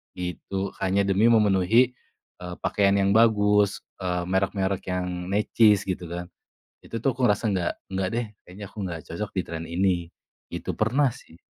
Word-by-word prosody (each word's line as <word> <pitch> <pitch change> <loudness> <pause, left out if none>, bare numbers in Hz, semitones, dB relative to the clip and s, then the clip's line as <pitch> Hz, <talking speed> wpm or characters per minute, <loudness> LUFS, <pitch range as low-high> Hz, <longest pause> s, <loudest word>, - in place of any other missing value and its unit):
gitu, 95 +2 -4
hanya 95 +1 +2
demi 100 +2 +2
memenuhi, 110 +3 +4 0.5
eee, 90 0 -7
pakaian 100 -1 +2
yang 100 0 +2
bagus, 105 -3 +4 0.2
eee, 90 -1 -1
merek-merek 95 0 0
yang 90 -1 -3
necis 105 0 +4
gitu 90 -1 -3
kan, 90 0 -5 0.6
itu 115 - -5
tuh 135 - +3
aku 130 - 0
ngerasa 105 +1 +1
nggak 90 -2 0 0.2
nggak 95 -1 0
deh 120 -1 -1 0.2
kayaknya 100 +3 -10
aku - - -28
nggak 85 -2 -5
cocok 105 +6 -4
di - - +3
tren 85 0 -5
ini, 90 -1 0 0.4
itu - - -4
pernah 130 +6 +2
sih. 80 - -16
95 Hz, 160 wpm, -25 LUFS, 90-105 Hz, 0.6 s, memenuhi